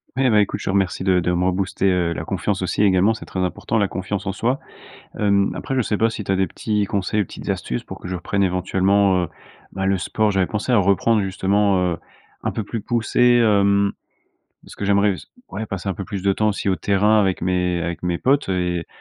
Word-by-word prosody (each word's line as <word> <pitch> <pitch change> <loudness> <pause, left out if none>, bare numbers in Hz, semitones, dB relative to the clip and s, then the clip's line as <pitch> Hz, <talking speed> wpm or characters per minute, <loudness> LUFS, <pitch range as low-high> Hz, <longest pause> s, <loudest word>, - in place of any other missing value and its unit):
Ouais, 130 0 +2
bah, 105 -2 +4
écoute, 100 - -1
je - - -8
te - - -2
remercie 95 -1 0
de 95 -1 +3
de 90 +1 0
me 90 +1 0
rebooster, 95 +1 0
heu, 90 -2 +1
la 80 - -5
confiance 95 +2 -2
aussi 95 +3 0
également, 100 +3 +3
c'est - - -9
très 95 - -5
important 90 +4 -1
la 100 - +2
confiance 95 +1 -4
en 95 - +1
soi. 125 +7 -1 0.6
Hem, 100 -1 +2
après, 135 - -4
je 130 - +2
sais 105 -2 -1
pas 115 0 +3
si 110 -2 -5
tu 95 - -3
as 95 - +2
des 95 - +1
petits 105 -2 -1
conseils, 100 +2 -1
ou - - -1
petites - - -9
astuces 60 -1 -2
pour - - -9
que - - -8
je 95 - -3
reprenne 100 +3 -2
éventuellement, 95 +1 +2
heu, - - -3 0.5
bah, 95 0 -2
le 95 0 +2
sport. 105 +4 0
J'avais 95 -1 +2
pensé 105 +4 -2
à 120 - +5
reprendre, 100 +3 +3
justement, 95 +1 +1 0.2
heu, - - -16 0.5
un - - 0
peu 110 - -2
plus 115 +3 -4
poussé, 120 +2 +2
hem, 100 -2 +3 0.7
parce - - -14
que 100 - -4
j'aimerais 100 0 +3
s - - -11 0.2
ouais, 110 - -5
passer 100 -1 -5
un 95 - -1
peu 100 - -6
plus 95 0 -5
de 100 0 +3
temps 110 +2 +1
aussi 100 - -3
au 95 - +2
terrain 100 +5 +3
avec 95 -2 0
mes 90 -1 0
avec 85 +1 -4
mes 90 -1 0
potes 140 -3 +1
et 90 -2 -1
100 Hz, 240 wpm, -21 LUFS, 95-105 Hz, 0.7 s, à